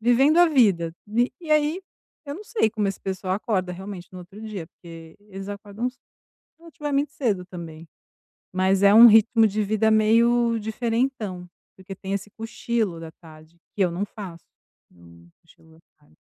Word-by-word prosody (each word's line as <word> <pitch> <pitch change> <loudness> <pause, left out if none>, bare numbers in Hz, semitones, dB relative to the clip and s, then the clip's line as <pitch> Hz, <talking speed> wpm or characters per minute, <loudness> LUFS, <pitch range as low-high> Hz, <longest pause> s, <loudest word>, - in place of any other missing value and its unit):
vivendo 265 +7 +4
a 350 - +7
vida, 195 - +2
vi 235 +4 +1
E, 335 - -12
e - - -5
aí, 305 +4 +2 0.5
eu 285 - -5
não 410 - -10
sei 425 - +1
como 210 -2 -1
esse 195 - -4
pessoal 190 -1 -3
acorda 195 -3 -2
realmente 190 -1 -8
no 185 - -9
outro 190 +4 -13
dia, 205 -7 -6
porque 165 -2 -13
eles 195 0 -8
acordam 205 +3 -5
ce 255 - -32 0.6
relativamente 295 -3 -3
cedo 210 -9 -1
também, 165 -3 -9 0.7
mas 190 +1 +2
é 200 +1 +7
um 230 +2 +10
ritmo 225 0 +5
de 210 +1 -1
vida 215 +2 +1
meio 230 +2 +3
diferentão, 220 -4 -2 0.3
porque 190 +1 -9
tem 190 +1 -6
esse 200 +1 -4
cochilo 225 -5 -3
da 165 -1 -9
tarde, 160 0 -17 0.2
que 200 - -2
eu 175 - +1
não 190 +4 -2
faço, 190 -5 -10 0.5
eu - - -25
não 85 0 -18
cochilo 160 -1 -22
à - - -21 0.2
tarde. 75 +1 -28
205 Hz, 175 wpm, -24 LUFS, 180-235 Hz, 0.7 s, um